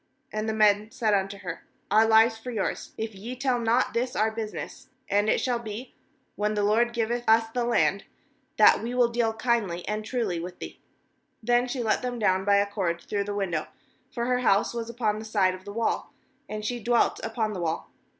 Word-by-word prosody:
14And 215 +1 -2
the 220 - 0
men 210 0 +3
said 225 -2 0
unto 195 0 0
her: 180 -4 -7 0.3
'Our 220 +1 +5
Me 220 0 +7
for 225 +1 -8
yours, 220 -5 -3
if 220 0 -4
ye 220 +6 -7
tell 255 -1 0
not 235 +2 +1
this 245 +2 -1
our 215 +2 +2
business; 220 -1 -6 0.2
and 205 +2 +2
it - - +3
shall 245 -2 0
be, 225 +2 -7 0.4
when 210 +1 -1
the 205 - +1
LORD 225 +4 +3
giveth 235 +1 -1
us 225 0 +4
the 245 +1 -1
land, 235 0 +1 0.5
that - - +6
we 235 +2 -4
will 245 -1 +4
deal 235 -1 +1
kindly 220 -7 -1
and 215 +1 -2
truly 220 -7 -2
with 180 +1 -7
thee.' - - -9 0.7
15Then 245 +1 +3
she 245 -1 -2
let 220 - +1
them 250 -1 -3
down 190 -3 +1
by 200 0 +4
a 200 0 +4
cord 190 -5 -2
through 200 +2 -2
the 205 0 -4
window; 175 -6 -1 0.4
for 235 -1 -2
her 250 0 +1
house 200 -4 +2
was 230 -1 -4
upon 220 -3 -1
the - - -7
side 200 -4 +2
of 185 0 -11
the 205 - -7
wall, 230 +2 -1 0.4
and 215 0 -5
she 245 +2 -2
dwelt 240 +1 +2
upon 225 -1 -2
the 185 - -4
wall. 165 -1 -3
220 Hz, 210 wpm, -26 LUFS, 205-235 Hz, 0.7 s, Me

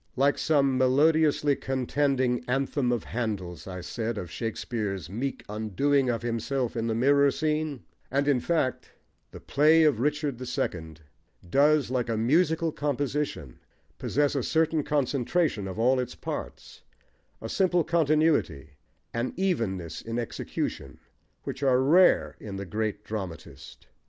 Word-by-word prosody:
Like 140 +2 +2
some 140 -3 +2
melodiously 145 +2 +3
contending 130 -1 0
anthem 135 0 0
of 120 - -1
Handle's, 100 -8 -4
I 90 -1 -6
said, 115 +5 -4
of 90 -3 -6
Richard's 105 -5 -3
meek 130 +6 -3
"undoing" 125 +6 0
of 120 -1 -1
himself 120 +2 -2
in 115 0 -1
the 110 - 0
mirror 140 +4 +4
scene; 155 -3 -2 0.3
and, 140 +2 0
in 140 -3 +3
fact, 145 -2 -1 0.4
the - - -11
play 155 +3 +4
of 150 -7 +3
Richard 145 -1 -1
the 130 - -6
Second 80 -9 -4 0.5
does, 145 - +3
like 125 -2 -1
a 115 - 0
musical 160 +7 +2
composition, 145 - -3 0.4
possess 145 0 +1
a 140 - 0
certain 160 +3 +1
concentration 140 - 0
of 95 - -6
all 125 +3 +3
its 125 - -4
parts, - - -7 0.6
a 115 - -6
simple 180 - +2
continuity, 150 - +1 0.4
an 120 +2 -2
evenness 95 - -1
in 115 +1 -5
execution, 120 -1 -4 0.5
which 135 - -6
are 130 -2 +3
rare 165 +8 +4
in 100 -2 -7
the 100 0 -5
great 105 +2 -3
dramatist. 90 -10 -8
130 Hz, 135 wpm, -27 LUFS, 110-145 Hz, 0.6 s, mirror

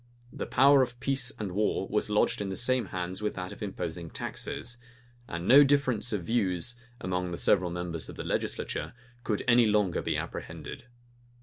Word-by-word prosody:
The - - -5
power 140 +1 +6
of 125 -1 -2
peace 135 -2 +1
and 105 -4 -4
war 100 0 0
was 105 0 0
lodged 105 0 +2
in 100 - -3
the 95 - -3
same 125 -1 +1
hands 90 +2 -4
with 105 - -2
that 90 -1 -5
of - - -14
imposing 85 -4 -5
taxes; 120 +7 -3 0.5
and 85 +2 -5
no 140 +3 +9
difference 135 -4 +2
of 105 -5 -2
views, 100 0 0 0.2
among 90 0 -2
the 85 - -4
several 90 -3 +3
members 85 -2 -4
of - - -8
the - - -5
legislature, - - -2 0.3
could 105 -3 -1
any 120 -1 +6
longer 105 -4 +2
be - - -1
apprehended. - - -7
105 Hz, 180 wpm, -29 LUFS, 90-120 Hz, 0.5 s, no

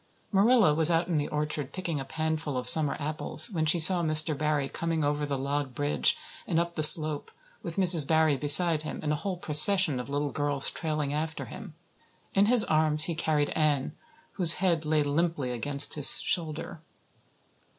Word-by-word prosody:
Marilla 205 -3 +1
was 160 +1 +1
out 170 0 -2
in 170 -3 -4
the 145 - -4
orchard 150 -2 -6
picking 170 -5 -7
a - - -7
panful 155 -1 -6
of 125 -1 -6
summer 150 +1 +3
apples 155 +8 +1
when 160 -4 -4
she 155 - 0
saw 175 +2 +5
Mr. 155 -1 +3
Barry 150 -1 -4
coming 165 +1 -5
over 145 0 -4
the 140 -1 -5
log 140 -1 -6
bridge 145 - -1 0.3
and 165 -3 -2
up 170 0 -5
the 155 - -6
slope, 155 -1 +5 0.3
with 170 -2 -9
Mrs. 175 -6 +1
Barry 160 -2 0
beside 155 +3 +4
him 155 - -9
and 150 - -4
a - - -2
whole 185 +3 -7
procession 155 -1 +4
of 125 +1 -10
little 145 0 -5
girls 145 -2 -4
trailing 150 -3 -6
after 160 +1 -7
him. 190 -8 -13 0.6
In 200 +1 0
his 240 -1 +4
arms 155 -1 +1
he 170 - -1
carried 155 -2 -3
Anne, 150 -4 -3 0.4
whose 175 -4 0
head 170 -4 -3
lay 150 -1 -2
limply 145 -2 -4
against 140 +4 +1
his 145 -2 +8
shoulder. 160 -1 -6
155 Hz, 180 wpm, -25 LUFS, 145-165 Hz, 0.6 s, his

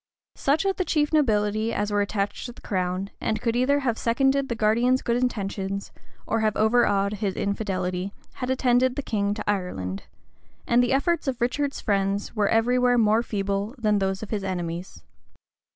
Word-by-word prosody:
Such 295 +6 +1
of 390 -1 +1
the 370 - +1
chief 300 -3 0
nobility 215 -6 +2
as 210 -1 -1
were 205 0 +2
attached 200 +3 -2
to 245 - -8
the - - -16
crown, 185 0 -2
and 215 0 -1
could 230 +1 -1
either 280 +4 +2
have 235 -4 -1
seconded 270 +3 +2
the 235 - -1
guardian's 235 +4 +2
good 235 - +1
intentions, 195 -4 -2 0.3
or 225 - 0
have 215 -1 +1
overawed 215 -3 +3
his 205 -2 -2
infidelity, 190 -2 -2 0.3
had 250 - -2
attended 255 -1 +2
the 285 - -3
king 205 -4 -1
into 210 +1 -3
Ireland; 180 - -2 0.6
and 240 +1 +4
the 245 - +1
efforts 310 +4 +1
of 255 -2 -1
Richard's 275 +4 -1
friends 200 +1 -1
were 210 -2 +2
every 240 +3 +3
where 245 0 +3
more 220 0 +4
feeble 200 +1 -2
than 210 -3 +2
those 195 +1 -1
of 215 - -8
his 210 -3 -2
enemies. 175 -1 -4
215 Hz, 180 wpm, -25 LUFS, 200-250 Hz, 0.6 s, and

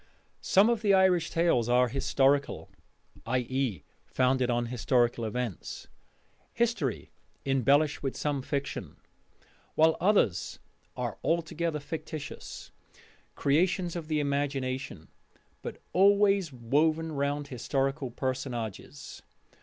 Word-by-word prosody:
Some 195 +3 +4
of 235 -2 +1
the 200 -3 +4
Irish 180 -4 +3
tales 165 -9 +2
are 125 +1 +4
historical, 140 +2 +1 0.6
i.e., 125 - -1 0.2
founded 130 -1 +1
on 120 0 +1
historical 120 -1 +1
events 115 -3 -5 0.6
history 230 - -1 0.3
embellished 140 +3 +2
with 135 -2 -3
some 145 -2 -1
fiction; 140 +1 -4 0.8
while 160 +1 +4
others 185 - +2 0.4
are - - -3
altogether 165 -1 -1
fictitious 155 -1 -7 0.6
creations 175 +4 +1
of 165 -3 -5
the 155 -1 0
imagination, 140 - -2 0.5
but - - -7
always 200 -2 +4
woven 155 +7 +1
round 145 0 -2
historical 135 +2 -1
personages. 130 0 -5
140 Hz, 100 wpm, -29 LUFS, 125-160 Hz, 0.8 s, Some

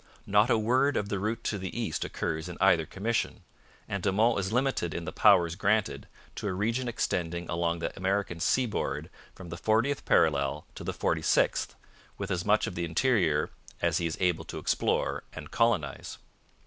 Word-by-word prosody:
Not 105 +4 +3
a 115 - +4
word 130 +6 +2
of 100 - -2
the 100 - -1
route 110 +4 -2
to 105 - -2
the 95 +5 -5
East 110 -10 -2
occurs 80 +3 -3
in 85 - -7
either 80 -2 +4
commission, 115 +4 -2 0.4
and 100 - -3
De 100 - +1
Monts 105 -1 +2
is - - -5
limited 125 - 0
in 85 - -4
the - - -4
powers 85 -1 +5
granted 100 -7 0 0.3
to - - -3
a 95 - -1
region 115 +6 -1
extending 85 -7 -2
along 85 0 0
the 85 - -4
American 95 -2 -1
seaboard 85 - 0 0.2
from 95 -3 -10
the 85 - -6
fortieth 115 +9 +1
parallel 70 -4 +2
to - - -8
the - - -2
forty - - -1
sixth, - - +1 0.4
with 100 -1 -4
as 90 -2 -1
much 105 +1 +3
of - - -5
the 85 - -3
interior 85 - +1 0.3
'as - - +1
he 85 - 0
is 80 - -4
able 90 -3 +1
to - - -7
explore - - 0
and - - -9
colonize.' 100 - 0
95 Hz, 185 wpm, -29 LUFS, 85-110 Hz, 0.4 s, powers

